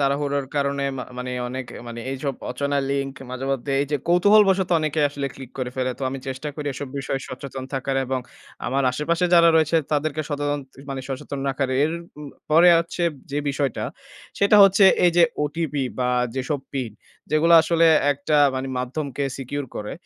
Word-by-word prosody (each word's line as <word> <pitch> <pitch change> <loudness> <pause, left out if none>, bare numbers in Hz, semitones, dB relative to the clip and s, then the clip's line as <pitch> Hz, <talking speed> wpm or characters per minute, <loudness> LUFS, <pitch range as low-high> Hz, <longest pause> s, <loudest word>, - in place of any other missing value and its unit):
তাড়াহুড়োর 140 0 0
কারণে 140 0 0
মা 125 - -4
মানে 125 0 -4 0.2
অনেক 130 +1 -5 0.2
মানে 120 0 -7
এইসব 135 +1 -3 0.2
অচেনা 140 +3 -1
লিঙ্ক 140 -1 -2 0.2
মাঝেমধ্যে 135 +1 -3
এইযে 145 +1 -1
কৌতূহলবশত 190 +1 +5
অনেকেই 155 -1 0
আসলে 140 -1 -4
ক্লিক 135 -2 -10
করে 125 -1 -2
ফেলে। 130 0 0
তো - - -8
আমি 135 - -5
চেষ্টা 130 +3 -4
করি 150 -1 -6
এসব 135 +1 -6
বিষয়ে 135 0 -3
সচেতন 130 0 -7
থাকার 135 0 -1
এবং 130 0 -1 0.5
আমার 135 +3 0
আশেপাশে 165 +6 0
যারা 170 -1 +7
রয়েছে 160 +1 +3 0.2
তাদেরকে 155 +1 0
সচেতন 145 -1 -1 0.3
মানে 135 -1 -3
সচেতন 135 +1 -5
রাখার। 135 0 -1
এর 155 - +2 0.3
উম 150 -1 -8 0.2
পরে 165 +3 +7
হচ্ছে 170 +1 -3 0.3
যে 145 - -1
বিষয়টা 140 -2 -1 0.5
সেটা 200 +1 +5
হচ্ছে 195 +1 +6 0.2
এইযে 175 0 +4 0.2
ওটিপি 150 -1 -2 0.2
বা 125 -1 +1 0.3
যেসব 135 +2 -2
পিন 130 -6 -3 0.4
যেগুলো 155 +2 +3
আসলে 165 0 +3 0.3
একটা 145 +2 -1 0.2
মানে 130 0 -3
মাধ্যমকে 140 +2 -3
secure 140 +1 -4
করে। 105 - -5
140 Hz, 165 wpm, -23 LUFS, 135-155 Hz, 0.5 s, যারা